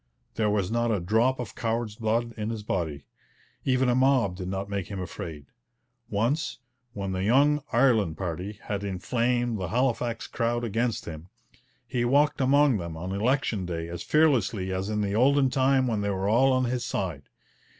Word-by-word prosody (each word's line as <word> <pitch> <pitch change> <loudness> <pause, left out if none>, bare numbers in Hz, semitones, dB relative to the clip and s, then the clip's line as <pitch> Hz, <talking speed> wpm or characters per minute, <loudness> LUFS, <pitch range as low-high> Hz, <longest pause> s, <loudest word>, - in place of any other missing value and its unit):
There 110 -1 +1
was 105 -2 0
not 120 0 +1
a 105 - +1
drop 110 +9 +2
of 125 - -5
coward's 115 -2 -2
blood 115 +2 -1
in 110 -1 -3
his 110 -2 -4
body. 80 -8 -3 0.6
Even 130 -1 +2
a 125 - +3
mob 130 -7 +3
did 90 -1 -6
not 95 +1 -3
make 100 -2 -3
him 100 -2 -6
afraid. 80 -5 -6 0.6
Once, 120 +5 0 0.4
when 100 -2 -4
the 95 0 -2
'young 140 +8 +4
Ireland' 115 - +3
party 90 +3 -4
had 100 -1 -3
inflamed 120 +4 0
the 90 - -2
Halifax 120 +1 0
crowd 120 0 -1
against 115 +1 -1
him, 80 +1 -8 0.6
he 120 0 -1
walked 140 +4 +3
among 140 -1 +4
them 85 -3 -6
on 90 +3 -5
election 110 -2 0
day 85 -1 -4
as 85 0 -6
fearlessly 120 -11 +2
as 95 +2 -2
in 105 -1 -1
the 100 -1 -1
olden 135 +3 +4
time 130 0 +3
when 110 -4 0
they 100 - -1
were 95 0 -1
all 125 +6 +4
on 130 0 +2
his 125 0 -1
side. 85 - -4
110 Hz, 180 wpm, -27 LUFS, 95-125 Hz, 0.6 s, young